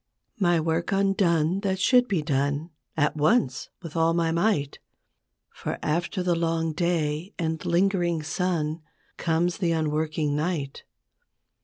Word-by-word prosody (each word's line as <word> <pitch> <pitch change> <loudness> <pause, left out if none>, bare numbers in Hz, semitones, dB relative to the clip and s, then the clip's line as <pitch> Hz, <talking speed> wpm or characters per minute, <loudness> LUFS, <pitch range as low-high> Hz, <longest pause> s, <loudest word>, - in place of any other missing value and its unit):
My 175 -3 +3
work 165 +1 -1
undone, 190 -3 +2
that 195 -2 -1
should 250 +5 +4
be 185 -8 0
done 145 +2 -1 0.3
At 150 0 +2
once 150 - +1
with 165 -1 -8
all 165 0 +3
my 165 -1 +1
might; 170 -5 0 0.7
For - - -4
after 170 +4 -1
the 180 -1 +2
long 165 -1 0
day 165 +1 -1
and 160 -2 -2
lingering 175 -2 +1
sun 160 -1 -1 0.4
Comes 170 +1 0
the 170 -3 +1
unworking 155 -1 0
night. 150 -3 -3
165 Hz, 130 wpm, -26 LUFS, 155-180 Hz, 0.7 s, should